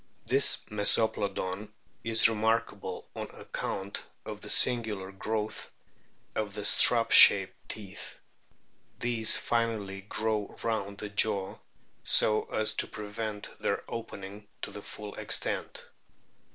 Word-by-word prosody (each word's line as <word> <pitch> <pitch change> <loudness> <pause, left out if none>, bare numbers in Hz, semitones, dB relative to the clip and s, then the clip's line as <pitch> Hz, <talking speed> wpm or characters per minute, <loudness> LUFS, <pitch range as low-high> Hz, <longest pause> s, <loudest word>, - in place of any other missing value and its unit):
This 135 +1 +3
Mesoplodon 105 -2 -1 0.3
is 115 0 +4
remarkable 110 -4 -2
on - - -6
account 100 +1 -5 0.2
of - - -7
the - - -9
singular 110 -6 +1
growth 110 +2 -4 0.6
of 105 -2 -3
the 105 -1 -5
strap 115 +1 +6
shaped 95 -2 +8 0.2
teeth. 100 -2 -8 0.8
These 120 -2 +4
finally 110 -5 -2
grow 105 +1 -3
round 100 -3 -2
the 105 - -5
jaw 100 -2 0 0.4
so 110 0 +5
as 110 0 0
to - - +2
prevent 105 0 -6
their - - -2
opening 105 -2 -8 0.2
to - - -4
the 105 - -8
full 105 0 -8
extent. - - -2
105 Hz, 110 wpm, -29 LUFS, 100-110 Hz, 0.8 s, shaped